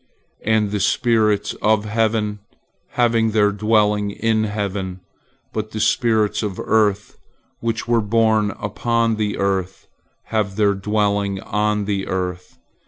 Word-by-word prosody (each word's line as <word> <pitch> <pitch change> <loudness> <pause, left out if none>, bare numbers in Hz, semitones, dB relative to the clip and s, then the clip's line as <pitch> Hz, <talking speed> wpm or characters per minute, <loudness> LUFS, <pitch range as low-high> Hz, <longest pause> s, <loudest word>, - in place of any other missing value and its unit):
And 110 -2 +1
the 105 - -1
spirits 110 -1 +2
of 110 -1 +2
heaven 105 -1 0 0.5
have 120 -1 +2 0.2
their 105 -1 +3
dwelling 105 0 +2
in 110 +1 0
heaven, 100 -3 -3 0.5
but 110 0 -3
the 110 - -5
spirits 110 -2 +2
of 105 -4 -3
the - - -5
earth, 105 -2 +1 0.4
which 115 0 -2
were 120 -1 +3
born 110 0 +2
upon 115 +1 0
the 105 -1 -1
earth, 95 -1 -2 0.5
have 105 -3 0
their 105 -1 +3
dwelling 100 -1 0
on 105 0 0
the 100 -1 -2
earth. 90 -1 -4
105 Hz, 130 wpm, -20 LUFS, 100-110 Hz, 0.5 s, their